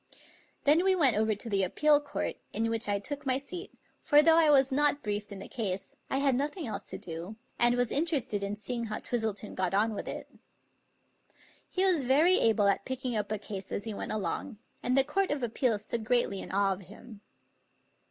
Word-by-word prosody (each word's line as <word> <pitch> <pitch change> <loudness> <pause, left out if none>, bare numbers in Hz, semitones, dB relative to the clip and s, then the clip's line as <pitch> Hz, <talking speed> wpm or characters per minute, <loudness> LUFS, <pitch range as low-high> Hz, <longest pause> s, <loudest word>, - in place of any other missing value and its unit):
Then 305 +5 +4
we 380 0 +4
went 280 -9 +5
over 215 0 +1
to 210 - -9
the 200 -3 +1
Appeal 295 +10 +3
Court, 290 - -4 0.2
in 225 +1 0
which 225 -2 -1
I 200 - +1
took 285 +8 -4
my 260 -2 +2
seat; 355 +8 -6 0.3
for 295 -1 +5
though 325 0 +6
I 325 -2 +5
was 270 -2 +5
not 290 +1 +2
briefed 205 -1 -3
in 200 - -7
the 195 - -9
case, 195 -6 -4
I - - 0
had 275 -1 +2
noth 285 +7 -2
ing 345 - -4
else 225 - -5
to - - -5
do, 170 +5 -7 0.2
and 240 0 +5
was 245 -1 0
interested 280 -10 0
in 200 +1 -2
seeing 235 +3 -3
how 215 -1 -4
Twistleton 220 -3 -3
got 185 0 -1
on 220 +2 +2
with - - -6
it. - - -6 1.4
He 370 - 0
was 350 -7 +3
very 305 +9 +4
able 220 -3 +3
at 200 - +1
picking 260 -2 -3
up 210 -1 -2
a 215 - 0
case 200 -2 -6
as 200 - -3
he 225 - -4
went - - -5
along, 215 +4 -3 0.2
and 255 +2 0
the 270 - +6
Court 390 +7 0
of 290 -3 -2
Appeals 230 -2 0
stood 230 +1 -3
greatly 220 -4 +1
in - - -8
awe 195 0 +2
of 190 - -9
him. 210 +3 -13
235 Hz, 215 wpm, -29 LUFS, 205-285 Hz, 1.4 s, though